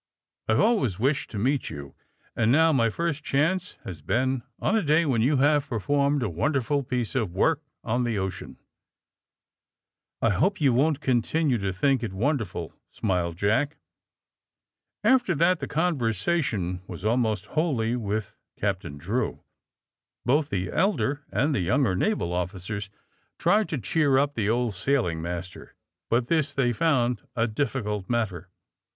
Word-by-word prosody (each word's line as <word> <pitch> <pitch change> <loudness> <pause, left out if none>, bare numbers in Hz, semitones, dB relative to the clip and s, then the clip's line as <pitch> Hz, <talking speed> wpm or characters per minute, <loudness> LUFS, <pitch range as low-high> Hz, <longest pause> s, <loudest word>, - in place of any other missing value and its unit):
*'I 110 - +3
have 110 - +2
always 200 - +2
wished 140 +7 0
to 110 - -6
meet 130 +5 0
you, 70 -3 -8 0.4
and 115 0 +2
now 160 +3 +5
my 115 -4 +3
first 155 +3 -2
chance 165 +7 0
has 85 -6 -7
been 130 - 0 0.2
on 220 - 0
a 220 - +3
day 155 0 +3
when 125 -6 +1
you 135 +5 +3
have 145 +1 +3
performed 140 +4 +1
a - - 0
wonderful 140 - 0
piece 125 -2 -3
of 110 -10 -1
work 155 +9 +2 0.2
on 120 +2 0
the 115 -3 -1
ocean." 95 -2 -4 1.7
*^I 115 - +4
hope 185 - +1
you 140 -5 +3
won't 145 +3 +2
continue 130 +1 +1
to 100 -1 -1
think 130 +7 +1
it 110 -5 -4
won 140 +10 +1
derful," 90 - -6 0.2
smiled 90 -5 -1
Jack. 110 - +1 1.3
After 235 -5 +3
that 170 +4 +3
the - - -4
conversation 115 - 0
was 90 +2 -8
almost 110 -2 +1
wholly 130 -8 +1
with 105 -2 -3 0.2
Captain 95 -7 -2
Drew. 100 - -2 0.8
Both 145 +3 +2
the 95 -1 -2
elder 160 -7 +1
and 145 +3 +1
the 130 - +1
younger 110 +2 +2
naval 200 - 0
officers 95 +3 -4 0.5
tried 210 0 +2
to 150 - -2
cheer 140 +1 +2
up 140 +1 +2
the 110 -5 -1
old 120 -1 +1
sailing 95 -5 0
master, 90 +1 -6 0.3
but 120 +1 +2
this 155 0 0
they 125 -3 +2
found 125 -3 +1
a 115 -1 +2
difficult 105 -5 -2
matter. 100 -7 -2
120 Hz, 155 wpm, -26 LUFS, 100-145 Hz, 1.7 s, now